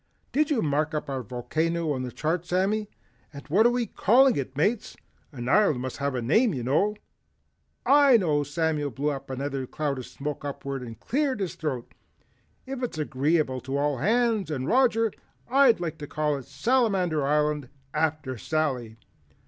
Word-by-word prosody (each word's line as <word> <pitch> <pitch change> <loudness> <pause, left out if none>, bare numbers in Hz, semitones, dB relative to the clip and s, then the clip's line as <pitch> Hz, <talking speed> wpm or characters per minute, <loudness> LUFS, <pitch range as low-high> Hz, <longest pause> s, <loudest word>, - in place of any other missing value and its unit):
"Did 300 +2 +2
you 275 -7 +1
mark 150 +1 0
up 150 -1 -3
our 135 -1 -2
volcano 155 +8 -2
on 130 - -3
the 125 -1 -4
chart 160 +5 -1
Sammy, 195 +4 0 0.4
and 140 -2 -11
what 210 +9 +5
are - - +4
we 245 -1 0
calling 255 +5 +4
it 135 -1 -4
Mates? 205 +9 0 0.3
An 120 -4 -6
island 155 -4 +4
must 130 0 -5
have 140 -1 -1
a 125 - -2
name 215 - +3
you 125 - -3
know." 175 - +1 0.9
"I 280 -3 +6
know." 155 -8 +1
Samuel 150 0 -1
blew 140 +4 -1
another 135 -1 -4
cloud 145 -2 -2
of 125 - -7
smoke 145 0 -5
upward 140 -1 -4
and 115 -2 -9
cleared 270 -2 0
his 190 -3 -2
throat. 135 -7 -4 0.7
"If 265 -1 -5
it's 245 -10 -3
agreeable 145 -2 0
to 135 +1 -3
all 145 -2 0
hands 220 - +1
and 135 -3 -3
Roger, 230 -2 +3 0.3
I'd 260 -4 +5
like 165 -2 -4
to 145 - -6
call 150 0 0
it 135 - -9
Salamander 195 - +1
Island 150 -1 +1 0.2
after 155 -5 -1
Sally." 130 -8 -2
155 Hz, 170 wpm, -26 LUFS, 135-210 Hz, 0.9 s, I